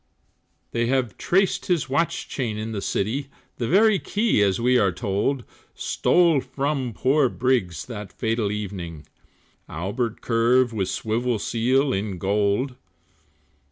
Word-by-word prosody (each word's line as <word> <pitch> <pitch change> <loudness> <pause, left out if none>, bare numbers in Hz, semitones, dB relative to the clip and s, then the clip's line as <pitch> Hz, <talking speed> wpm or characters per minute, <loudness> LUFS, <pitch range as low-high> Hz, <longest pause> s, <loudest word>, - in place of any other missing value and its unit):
They 120 0 0
have 130 -3 0
traced 190 +1 +1
his 175 -7 +1
watch 145 +5 0
chain 115 -6 -3
in 110 +1 -4
the 105 -3 -3
city, 125 +11 -1 0.3
The 120 - -2
very 205 - +4
key, 210 - +1
as 100 0 +2
we 125 +1 +3
are 100 - +3
told, 105 +7 -1 0.3
Stole 170 -5 +3
from 135 -3 -2
poor 130 +4 +2
Briggs 115 - 0
that 105 -4 -7
fatal 110 -2 -1
evening, 90 -7 -5 0.6
Albert 105 +8 -3
curb, 120 +1 +2
with 95 -4 -1
swivel 115 +3 -1
seal 130 +6 +1
in 100 -1 -2
gold. 105 +7 0
120 Hz, 130 wpm, -24 LUFS, 105-135 Hz, 0.6 s, very